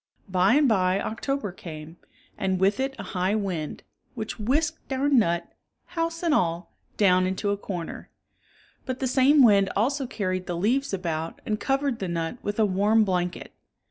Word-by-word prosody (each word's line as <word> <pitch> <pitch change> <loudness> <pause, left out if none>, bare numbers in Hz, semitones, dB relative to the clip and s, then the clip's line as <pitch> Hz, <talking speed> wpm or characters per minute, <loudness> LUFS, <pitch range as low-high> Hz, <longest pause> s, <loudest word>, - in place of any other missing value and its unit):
By 190 +5 +3
and 295 -1 +4
by 190 -4 +2
October 230 0 -3
came, 160 -2 -9 0.4
and 190 -1 -1
with 195 +5 +2
it 270 0 -1
a - - -6
high 185 +2 +1
wind, 185 -8 -3 0.3
which 220 -1 -5
whisked 295 +8 -1
our 265 +2 +1
nut, 170 -11 +2 0.3
house 330 0 -3
and 335 -3 +2
all, 170 - 0 0.2
down 185 -3 +4
into 190 +2 -1
a - - +1
corner. 180 -4 -6 0.8
But 255 -1 -2
the 265 - -1
same 270 +3 +5
wind 200 -4 +5
also 265 +6 0
carried 185 -5 -3
the 175 - -2
leaves 255 +9 +1
about 165 -4 -3
and 210 -1 -1
covered 270 0 0
the 190 - -3
nut 170 +6 -3
with 205 0 -3
a 220 - +4
warm 205 +3 +3
blanket. 180 -3 -2
205 Hz, 170 wpm, -26 LUFS, 185-260 Hz, 0.8 s, same